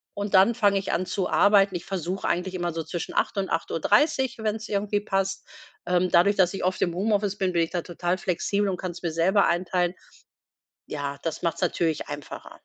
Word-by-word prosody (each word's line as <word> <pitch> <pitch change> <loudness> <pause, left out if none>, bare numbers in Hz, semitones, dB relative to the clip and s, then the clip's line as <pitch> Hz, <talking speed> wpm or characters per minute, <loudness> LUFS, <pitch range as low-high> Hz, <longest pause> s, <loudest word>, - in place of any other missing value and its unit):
und 205 0 -4
dann 195 +5 +6
fange 200 -4 +3
ich 190 - -4
an 185 - 0
zu 190 0 -2
arbeiten, 200 -2 +4
ich 175 - -5
versuche 190 0 -3
eigentlich 180 +2 -1
immer 175 -2 -2
so 165 -1 -3
zwischen 165 +2 -5
8:00 - - 0
und 195 -1 -1
8:30,, 250 - +1
wenn's 215 0 -2
irgendwie 205 0 0
passt. 195 -1 -2 0.4
Ähm, 180 0 +1
dadurch, 200 +4 +5
dass 185 -1 +3
ich - - -5
oft 185 - -1
im 175 - +1
Homeoffice 205 0 0
bin, 185 -2 0
bin 170 - +2
ich 165 - -3
da 175 -2 -2
total 175 +1 -2
flexibel 200 +3 -1
und 185 -2 -1
kann's 180 -1 -6
mir 165 - -1
selber 190 +5 +3
einteilen. 175 +1 0 0.9
Ja, 140 -1 -4
das 165 - -3
macht's 170 - -1
natürlich 165 -3 0
einfacher. 145 -1 -8
185 Hz, 200 wpm, -25 LUFS, 175-200 Hz, 0.9 s, dann